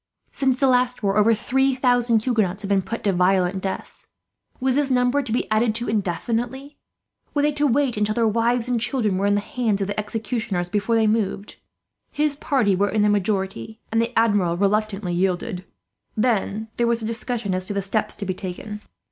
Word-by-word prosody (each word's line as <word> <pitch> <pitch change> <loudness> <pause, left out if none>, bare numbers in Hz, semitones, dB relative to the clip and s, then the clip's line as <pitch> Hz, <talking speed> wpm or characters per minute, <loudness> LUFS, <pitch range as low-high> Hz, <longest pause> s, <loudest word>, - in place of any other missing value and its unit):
Since 265 -2 0
the 275 - +3
last 250 -2 +2
war 195 0 +1
over 210 +2 +4
three 265 +5 +1
thousand 245 -3 +2
Huguenots 215 -5 0
had 200 - -4
been 200 -1 +3
put 230 +5 -6
to 200 - +2
violent 185 +1 +2
deaths. 190 0 -5 0.6
Was 260 0 +1
this 285 -1 +2
number 250 +2 +2
to 250 - -6
be 235 - 0
added 215 0 +2
to 235 +1 0
indefinitely? 230 - -2 0.6
Were 290 - +2
they 300 - +3
to 295 0 +1
wait 265 -2 +1
until 210 +1 0
their 230 -1 +2
wives 230 +2 +1
and 245 -2 0
children 220 -7 0
were 200 - +1
in 205 - +3
the 205 - +1
hands 220 -2 -1
of 195 - 0
the 205 +2 -3
executioners, 210 -4 -3
before 210 +4 0
they 225 -1 +3
moved? 210 -2 -1 0.5
His 300 -1 0
party 255 -9 +1
were 200 +2 +1
in 210 +1 +1
the 210 - +4
majority, 205 +2 -1
and 225 0 +2
the 230 +1 -1
Admiral 205 -7 +2
reluctantly 200 -1 0
yielded. 185 +2 -1 0.5
"Then 220 -1 0
there 235 - +2
was 235 -1 0
a - - -2
discussion 225 -2 -2
as 185 0 -2
to - - -2
the 200 - -1
steps 205 +2 0
to 200 - -5
be 185 - -1
taken. 205 +3 -7
220 Hz, 200 wpm, -23 LUFS, 200-245 Hz, 0.6 s, over